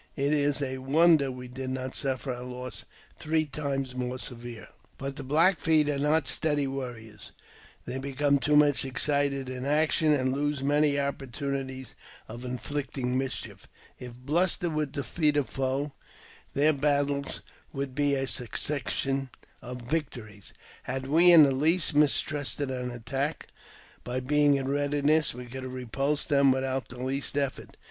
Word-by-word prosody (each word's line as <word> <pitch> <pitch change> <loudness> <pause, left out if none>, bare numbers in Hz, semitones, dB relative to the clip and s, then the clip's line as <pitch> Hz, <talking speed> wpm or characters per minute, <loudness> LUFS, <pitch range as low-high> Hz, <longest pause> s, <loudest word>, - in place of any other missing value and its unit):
It 140 +1 +1
is 145 -1 +1
a 130 -1 -3
wonder 145 +1 +4
we 125 0 -8
did 130 +1 -6
not 130 0 -4
suffer 135 -1 -1
a 125 - -7
loss 125 0 -7 0.3
three 155 0 0
times 135 -3 -3
more 125 0 -3
severe.. 120 -2 -7 0.3
But 135 0 -5
the 140 - -7
Black 165 +7 +3
Feet 155 -2 +3
are 140 - -2
not 150 +2 +2
steady 145 -3 +1
warriors; 120 -6 -7 0.5
they 130 - -4
become 140 +1 +1
too 150 +2 +2
much 145 -2 +5
excited 140 0 +1
in 130 0 -5
action, 155 +2 +2
and 130 -3 +2
lose 145 0 -1
many 145 +1 +3
opportunitlas 135 -2 -3 0.3
of 120 +3 -8
inflict 130 +3 -4
ing 125 -1 -1
mischief. 130 0 -4 0.3
If 125 -1 -9
bluster 170 +6 0
would 150 -2 -2
defeat 150 +2 0
a 145 - +3
foe, 135 +2 -2 0.6
their 150 +3 +4
battles 140 -1 0 0.3
would 135 -1 -4
be 145 0 +1
a 135 0 -1
succession 135 +2 -1 0.3
of 125 0 -8
victories. 120 -8 -5 0.3
Had 130 +1 -4
we 165 +6 +6
in 165 -3 +9
the 140 - +4
least 155 +5 +3
mistrusted; 145 -1 +1
an 125 -1 -3
attack, 135 +6 -4 0.5
by 125 +1 -2
being 145 +2 +3
in 135 -1 -2
readiness 145 +1 +1
we 125 0 -8
could 130 +2 -8
have 130 0 -6
repulsed 135 +4 -2
them 140 -2 +5
without 130 0 -1
the 125 0 -8
least 135 +2 -1
effort. 140 -2 -3
140 Hz, 155 wpm, -28 LUFS, 130-145 Hz, 0.6 s, in